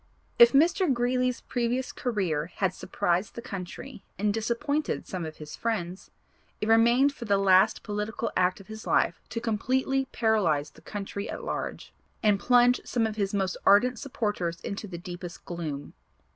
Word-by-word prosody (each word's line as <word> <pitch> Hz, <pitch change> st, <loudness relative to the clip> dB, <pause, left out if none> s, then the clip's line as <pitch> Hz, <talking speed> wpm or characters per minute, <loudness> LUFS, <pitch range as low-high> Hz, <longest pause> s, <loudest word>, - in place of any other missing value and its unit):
If 235 Hz, 0 st, +9 dB
Mr. 330 Hz, +4 st, +4 dB
Greeley's 250 Hz, 0 st, +1 dB
previous 245 Hz, +1 st, -1 dB
career 185 Hz, -11 st, -1 dB
had 190 Hz, -2 st, 0 dB
surprised 180 Hz, +4 st, -1 dB
the 235 Hz, -, -5 dB
country 205 Hz, +2 st, -7 dB
and 205 Hz, +2 st, +1 dB
disappointed 235 Hz, +7 st, -1 dB
some 180 Hz, -4 st, -4 dB
of 155 Hz, -, -9 dB
his 150 Hz, -1 st, -8 dB
friends, 190 Hz, -5 st, -3 dB, 0.5 s
it 210 Hz, -, -2 dB
remained 235 Hz, +5 st, +5 dB
for 240 Hz, -, -8 dB
the 200 Hz, -2 st, +3 dB
last 190 Hz, -1 st, +4 dB
political 210 Hz, +2 st, -3 dB
act 185 Hz, +1 st, +2 dB
of 195 Hz, -, -13 dB
his 220 Hz, +1 st, -9 dB
life -, -, +2 dB
to 230 Hz, -, -3 dB
completely 260 Hz, +4 st, 0 dB
paralyze 180 Hz, -11 st, +1 dB
the -, -, -18 dB
country 200 Hz, 0 st, -5 dB
at -, -, -6 dB
large, -, -, -5 dB, 0.3 s
and 205 Hz, -2 st, +4 dB
plunge 245 Hz, +1 st, +4 dB
some 235 Hz, -2 st, 0 dB
of 220 Hz, -1 st, -2 dB
his 200 Hz, -2 st, 0 dB
most 195 Hz, -2 st, -1 dB
ardent 235 Hz, +4 st, +5 dB
supporters 205 Hz, -10 st, -2 dB
into 200 Hz, +1 st, -5 dB
the 175 Hz, -3 st, -7 dB
deepest 175 Hz, 0 st, -8 dB
gloom. 155 Hz, -5 st, -5 dB
210 Hz, 160 wpm, -27 LUFS, 185-245 Hz, 0.5 s, If